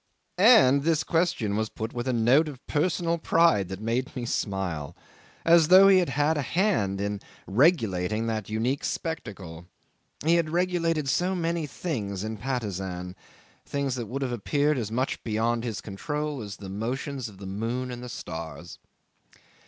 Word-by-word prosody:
'And 190 - +7
this 160 +1 +1
question 160 - 0
was 110 0 -1
put 110 +1 -5
with 120 +1 -4
a - - +2
note 125 +7 +4
of 135 -4 -9
personal 170 +2 0
pride 160 - +3
that 95 -1 -5
made 115 +4 -2
me 125 -2 -3
smile, 95 -10 -3 0.5
as 165 -1 +6
though 190 +3 +8
he 190 -1 +7
had 175 - 0
had 145 +4 +1
a - - +1
hand 140 - 0
in 100 0 -2 0.2
regulating 110 - +2
that 110 -2 -3
unique 120 +6 -1
spectacle. 95 - -5 0.6
He 170 +2 +5
had 165 -2 0
regulated 165 -3 0
so 180 +7 +1
many 170 -2 -1
things 105 - -4
in 110 0 -4
Patusan 95 -7 -4 0.5
things 140 -2 -2
that 120 -3 -4
would 135 +5 -3
have 130 - -2
appeared 145 +5 +1
as 110 -2 -4
much 130 +4 -2
beyond 115 +1 0
his 115 -5 -4
control 145 +7 -4
as 105 -1 -7
the 100 - -9
motions 125 +5 -4
of 100 - -15
the 100 - -9
moon 115 +6 -3
and 120 0 -6
the 125 - -7
stars. 85 -3 -7
125 Hz, 165 wpm, -27 LUFS, 105-155 Hz, 0.6 s, though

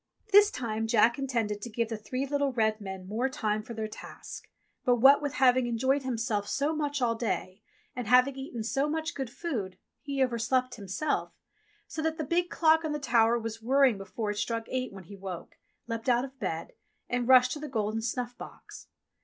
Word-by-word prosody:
'* 430 - -30
This 410 +1 +8
time 225 - -3
Jack 235 +2 +4
intended 230 -6 -1
to 240 - -5
give 230 0 -1
the 225 - -2
three 255 +5 -3
little 285 0 0
red 220 -3 +1
men 190 -2 -7
more 230 +6 0
time 215 -4 -1
for 230 +2 -9
their 220 0 -3
task; 215 - -10 0.3
but 245 - +4
what 270 +5 +7
with 290 -2 -2
having 255 -1 +4
enjoyed 260 +4 +1
himself 230 -5 -2
so 295 +7 0
much 290 -3 -1
all 235 -1 +3
day, 215 -4 -3 0.3
and 250 -4 -4
having 250 +3 +5
eaten 265 -4 -5
so 275 +6 0
much 320 +2 -2
good 270 -4 -4
food, 230 - -4 0.2
he 275 -2 0
overslept 250 +1 0
himself, 205 +8 -2 0.5
so 320 - -5
that 320 0 -1
the 310 - -2
big 345 +4 0
clock 320 0 +4
on 310 -1 -2
the 295 - -2
tower 235 -3 +3
was 225 -1 -5
whirring 260 -2 +3
before 205 +2 -3
it 205 - -6
struck 230 +1 -2
eight 255 0 -2
when 195 -1 -10
he 200 +4 -11
woke, 190 -3 -8 0.3
leapt 230 +1 -3
out 245 +1 +3
of 265 0 -13
bed, 165 0 -4 0.3
and 245 -1 -1
rushed 255 -1 +7
to 300 - -3
the 300 - -5
golden 220 -2 -1
snuff 245 +1 -3
box. - - -11
245 Hz, 205 wpm, -29 LUFS, 220-275 Hz, 0.5 s, This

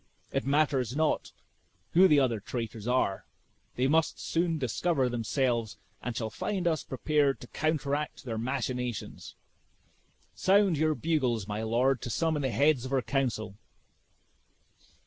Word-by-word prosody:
It - - -2
matters 140 -4 +1
not 155 0 0 0.6
who 185 +3 +7
the 150 -5 +5
other 120 -5 +1
traitors 115 0 -5
are; 125 -6 0 0.5
they 125 - +1
must 160 +3 +2
soon 165 -1 0
discover 135 +2 0
themselves, 120 -1 -1 0.2
and 120 -2 -4
shall 110 -2 -3
find 185 - -2
us 160 -3 0
prepared 145 +1 +1
to - - -9
counteract 150 -2 -1
their 115 -3 -3
machinations. 125 -1 -3 1.0
Sound 195 -2 +3
your 155 +1 +1
bugles, 130 -11 0
my 105 +1 -3
lord, 120 +3 +1
to - - -5
summon 160 +3 0
the 135 - 0
heads 140 0 +3
of 130 - -6
our 135 -2 +1
council." 120 -7 -1
135 Hz, 135 wpm, -29 LUFS, 120-155 Hz, 1.0 s, who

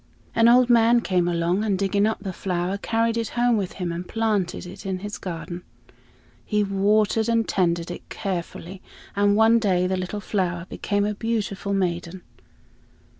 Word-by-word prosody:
An 230 0 +4
old 245 +1 +6
man 235 0 +5
came 180 -5 +1
along, 175 +3 0
and 205 -3 +1
digging 200 +2 +1
up 220 -2 -3
the 190 -2 -4
flower 180 +2 -2
carried 230 +2 0
it 230 -1 -1
home 240 0 +3
with 195 -4 -2
him 180 -3 -3
and 175 +1 -5
planted 210 -6 -1
it 190 +2 -10
in 190 -1 -2
his 205 +3 -6
garden. 175 0 -6 0.8
He 210 -1 +1
watered 210 +3 +2
and 230 -1 +2
tended 170 -2 0
it - - -9
carefully, 185 -1 -5 0.3
and 205 0 +3
one 225 +2 +5
day 185 -5 +1
the 185 +1 0
little 185 +3 -4
flower 180 -4 -2
became 205 0 -1
a 210 - -1
beautiful 205 -3 -2
maiden. 180 -1 -2
200 Hz, 170 wpm, -24 LUFS, 180-220 Hz, 0.8 s, old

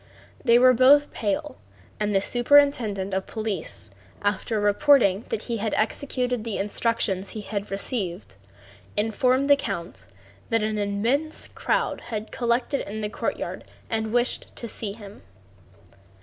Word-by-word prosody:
They 235 -3 +6
were 255 +1 +7
both 280 +4 +5
pale, 290 +8 -2 0.4
and 210 0 0
the 195 - +4
superintendent 240 -6 +3
of 190 0 -2
police, 205 - -5 0.3
after 210 +2 0
reporting 205 -1 +4
that 215 - -3
he 235 -2 -3
had 215 0 -1
executed 250 +1 -1
the 225 -3 -3
instructions 200 -2 -1
he 215 - -5
had 205 0 -4
received, 180 - -4 0.6
informed 250 +5 +2
the 285 - +7
count 170 - -6 0.4
that 225 -1 +1
an 215 0 -1
immense 230 +10 0
crowd - - -1
had 215 -1 -5
collected 240 +3 0
in 215 +2 -5
the 210 - -2
courtyard - - -4 0.3
and 220 -1 -1
wished 245 +1 0
to 235 - -5
see 210 -2 -5
him. 205 -2 -12
220 Hz, 135 wpm, -25 LUFS, 200-250 Hz, 0.6 s, were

